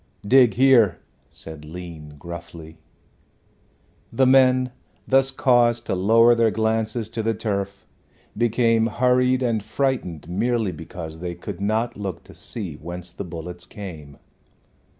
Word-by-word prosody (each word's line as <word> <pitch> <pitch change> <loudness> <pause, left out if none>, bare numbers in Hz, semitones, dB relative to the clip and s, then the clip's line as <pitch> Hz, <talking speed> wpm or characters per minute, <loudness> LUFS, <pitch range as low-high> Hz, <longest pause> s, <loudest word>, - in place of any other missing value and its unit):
"Dig 125 0 +5
here," 120 -8 +5 0.3
said 80 -2 -8
Lean 80 -2 -9
gruffly. 85 0 -10 1.3
The 130 - +3
men, 130 -1 +4 0.4
thus 135 0 +4
caused 120 -3 +2
to - - -2
lower 115 +6 +5
their 115 -1 +3
glances 110 0 -1
to 115 - -3
the 110 0 0
turf, 100 -2 -3 0.5
became 115 0 +2
hurried 125 +2 +2
and 115 -3 0
frightened 105 - -2
merely 110 +3 0
because 80 0 -8
they 90 0 -5
could 90 +1 -8
not 110 +4 -1
look 95 -4 -5
to - - -15
see 100 -9 -5
whence 90 +2 -7
the - - -6
bullets 85 0 -8
came. 80 -9 -9
110 Hz, 130 wpm, -23 LUFS, 85-120 Hz, 1.3 s, Dig